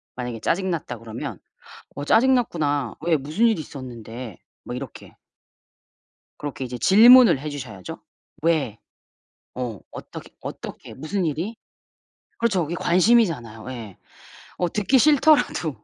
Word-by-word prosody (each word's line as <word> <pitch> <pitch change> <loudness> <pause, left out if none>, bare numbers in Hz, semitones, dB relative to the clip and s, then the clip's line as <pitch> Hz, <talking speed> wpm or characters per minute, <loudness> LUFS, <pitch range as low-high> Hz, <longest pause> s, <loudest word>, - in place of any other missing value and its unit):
만약에 125 -2 -5
짜증 190 +2 0
났다 155 -8 -4
그러면 110 -1 -7 0.6
"어 145 - -4
짜증 260 - +4
났구나. 145 - -1
왜 165 -1 +2
무슨 155 - +1
일이 220 -7 +2
있었는데?" 120 - -9 0.3
뭐 - - -6
이렇게. 125 -2 -9 1.2
그렇게 135 -3 -5
이제 125 -1 -6
질문을 230 - +7
해 150 +3 -6
주셔야죠. 115 -10 -8 0.4
"왜?" 150 -10 +1 0.8
어. 120 -5 -4
"어떻게 - - -10
어떻게 - - -8
무슨 180 +7 -3
일이?" 170 +8 -3 0.8
그렇죠. 210 -7 +1
그게 165 +3 -4
관심이잖아요. 170 - +2
예. 115 -7 -8 0.6
어 180 - 0
듣기 210 +6 +2
싫더라도. 290 - +3
150 Hz, 275 characters per minute, -23 LUFS, 125-195 Hz, 1.2 s, 질문을